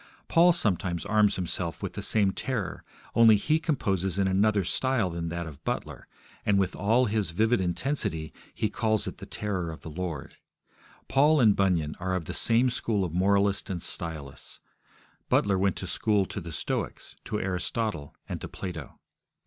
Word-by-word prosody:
Paul 175 +2 +6
sometimes 95 - 0
arms 105 0 +3
himself 90 -1 -3
with - - -3
the - - -5
same 100 -3 +3
terror; 110 -3 -3 0.3
only 115 -2 +7
he 155 +10 +2
composes 95 - -1
in 100 -1 +2
another 100 +1 +3
style 110 +2 0
than 85 0 -3
that 85 0 -3
of 75 -3 -10
Butler, - - -4 0.4
and, 100 -1 +3
with 95 -2 +1
all 115 +5 +3
his 105 -4 0
vivid 110 +6 +2
intensity, 90 - -2 0.2
he 110 - -1
calls 110 -1 0
it - - -6
the - - -9
terror 95 -5 -3
of 80 - -8
the 80 - -8
Lord. 85 -3 -5 0.7
Paul 150 +3 +4
and 110 -5 +5
Bunyan 85 -6 +1
are 95 +1 -1
of 90 -3 -3
the - - -5
same 120 +2 +3
school 110 -4 0
of 85 - -5
moralists 100 +2 +2
and 90 -3 -2
stylists; 80 -5 -6 0.7
Butler 100 -2 +3
went 95 -2 +2
to - - -5
school 105 -3 +1
to 100 - -6
the 85 -1 -7
Stoics, 70 - -4
to 105 - -2
Aristotle, 95 -4 -2
and - - -5
to - - -5
Plato. 90 -2 -7
100 Hz, 175 wpm, -28 LUFS, 85-110 Hz, 0.7 s, only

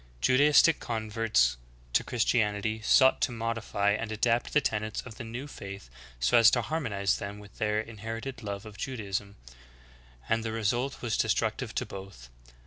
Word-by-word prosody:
5. - - +2
Judaistic 145 +4 +5
converts 110 - +1 0.4
to - - +3
Christianity 110 -2 0
sought 130 +4 +5
to - - +2
modify 115 -3 -1
and 110 +2 -2
adapt 115 +2 +1
the 150 - +4
tenets 110 -5 -2
of 115 -3 -11
the - - -6
new 120 +4 -6
faith 100 - -9 0.3
so - - +4
as 115 0 +8
to 120 - +1
harmonize 105 - -1
them 100 +1 -6
with 105 -2 -14
their 105 -1 +1
inherited 115 +4 -6
love 100 -1 -5
of 105 -1 -11
Judaism, 100 -5 -4 0.9
and 110 0 +1
the 115 - -3
result 120 +5 -1
was 115 -3 0
destructive - - 0
to - - -1
both. 95 -12 -10
110 Hz, 160 wpm, -29 LUFS, 100-120 Hz, 0.9 s, as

